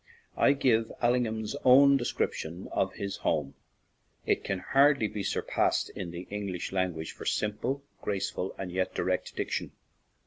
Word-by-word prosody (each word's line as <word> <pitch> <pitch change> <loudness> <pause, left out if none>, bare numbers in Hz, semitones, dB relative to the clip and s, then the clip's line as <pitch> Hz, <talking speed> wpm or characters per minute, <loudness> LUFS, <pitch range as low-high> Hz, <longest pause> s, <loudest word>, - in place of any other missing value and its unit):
I - - +5
give 115 -5 +2
Allingham's 120 -1 0
own 140 +2 +7
de 120 - -3
scription 85 -3 -2
of 95 0 0
his 100 -1 -4
home; 75 -4 -1 0.7
it - - +1
can 100 - -1
hardly 135 +4 +4
be 105 - -5
surpassed - - 0
in 90 - -5
the 85 +1 -6
English 100 -4 -4
language 90 -4 -1
for - - -10
sim 105 -1 +1
ple, 135 +3 -2 0.2
graceful, 95 -2 -2
and 95 -2 -5
yet 95 +1 -1
direct - - -1
diction. - - -3
105 Hz, 150 wpm, -29 LUFS, 95-125 Hz, 0.7 s, own